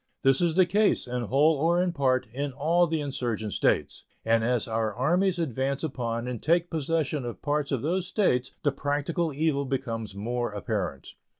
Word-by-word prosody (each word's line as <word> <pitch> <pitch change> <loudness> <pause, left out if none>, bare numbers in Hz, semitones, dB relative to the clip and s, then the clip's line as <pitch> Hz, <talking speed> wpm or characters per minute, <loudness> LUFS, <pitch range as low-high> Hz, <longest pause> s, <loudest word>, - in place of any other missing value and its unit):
This 135 +2 +4
is 170 -2 +2
the 185 0 +6
case, 205 +4 +2
in 125 0 -3
whole 145 +7 +4
or 170 +4 +2
in 180 0 +1
part, 130 -4 +1
in 140 +1 -3
all 165 +6 +2
the 160 0 -1
insurgent 120 -7 -3
States; - - 0 0.2
and 115 0 +3
as 120 0 +1
our 110 -1 0
armies 180 +8 +2
advance 135 -3 -1
upon 120 -5 -3
and 125 -3 -4
take 170 +2 +2
possession 155 -2 -1
of 120 -1 -7
parts 145 0 0
of 135 -3 -1
those 175 +4 0
States 130 - +1
the 145 - +3
practical 145 +4 -1
evil 145 -1 0
becomes 115 -6 -3
more 120 +2 -2
apparent. 70 -8 -3
140 Hz, 180 wpm, -27 LUFS, 120-165 Hz, 0.2 s, the